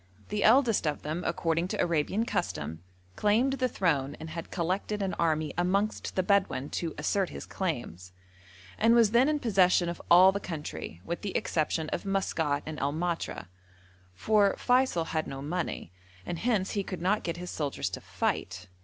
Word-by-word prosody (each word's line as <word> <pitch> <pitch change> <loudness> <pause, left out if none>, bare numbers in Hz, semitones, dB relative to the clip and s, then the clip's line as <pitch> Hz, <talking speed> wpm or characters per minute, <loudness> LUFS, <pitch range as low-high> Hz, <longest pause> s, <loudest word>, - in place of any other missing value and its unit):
The 210 0 -1
eldest 230 - +4
of 150 - -2
them, 155 +4 -3
according 165 0 0
to - - -4
Arabian 170 +6 +1
custom, 80 - -3 0.3
claimed 230 +6 +2
the 255 - +2
throne 150 - 0
and 160 0 -7
had 165 +1 -6
collected 190 +4 -2
an 190 - -1
army 155 -2 +1
amongst 200 +4 0
the 185 - +2
Bedouin 190 -8 +1
to 165 -2 -3
assert 185 +5 0
his - - -8
claims, 120 - -4 0.7
and 230 +2 +5
was 230 -3 +5
then 245 +5 +5
in 305 - +1
possession 185 -8 +3
of 170 - -6
all 185 +2 +8
the 200 - -3
country, 150 - -6
with 170 - -4
the 200 - -2
exception 155 0 -1
of - - -3
Maskat 165 -7 0
and 155 -1 -6
El 140 +1 0
Matra, 170 - -3 0.7
for 205 - +3
Feysul 250 -9 +2
had 155 -1 -1
no 135 - -6
money, 155 - -3 0.3
and 170 - -4
hence 215 -5 0
he 200 - -1
could 185 -2 -6
not 205 +4 +2
get 170 0 -3
his 180 0 -6
soldiers 145 -3 -2
to - - -6
fight. 95 0 -3
175 Hz, 175 wpm, -29 LUFS, 155-200 Hz, 0.7 s, all